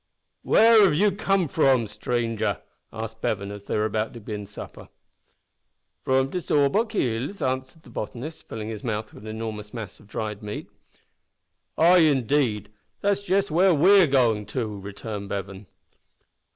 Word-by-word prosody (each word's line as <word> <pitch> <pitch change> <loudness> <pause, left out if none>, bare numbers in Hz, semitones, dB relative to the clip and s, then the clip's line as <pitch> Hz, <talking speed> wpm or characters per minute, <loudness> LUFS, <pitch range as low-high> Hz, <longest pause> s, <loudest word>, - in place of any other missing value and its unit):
"Where 225 -1 +6
have 180 -7 +4
you 205 +5 +3
come 195 -2 +1
from, 130 -3 +3
stranger?" 115 +1 -2 0.3
asked 110 0 -7
Bevan, 100 -1 -2
as 100 -1 -9
they - - -1
were 105 - +1
about 110 +2 -2
to - - -7
begin 105 -1 -6
supper. 105 - -10 1.1
"From 130 +1 +1
de 180 - -2
Sawbuk 150 - +1
Hills," 130 - -1
answered 130 +4 -3
the 120 - -15
botanist, 120 +8 -7
filling 110 -1 -5
his 110 -2 -6
mouth 110 -2 -3
with 105 - -12
an 110 - -5
enormous 110 -1 -6
mass 110 -4 -7
of 105 - -19
dried 105 -1 -4
meat. 105 0 -7 1.1
"Ay, 175 +3 +6
indeed! 130 - +2 0.3
That's 200 0 +1
just 195 -1 0
where 180 +2 +4
we 190 +7 +6
are 175 - +5
goin' 115 -7 +2
to," 115 +3 -2
returned 100 +1 -7
Bevan. 100 0 -5
120 Hz, 155 wpm, -25 LUFS, 105-160 Hz, 1.1 s, Where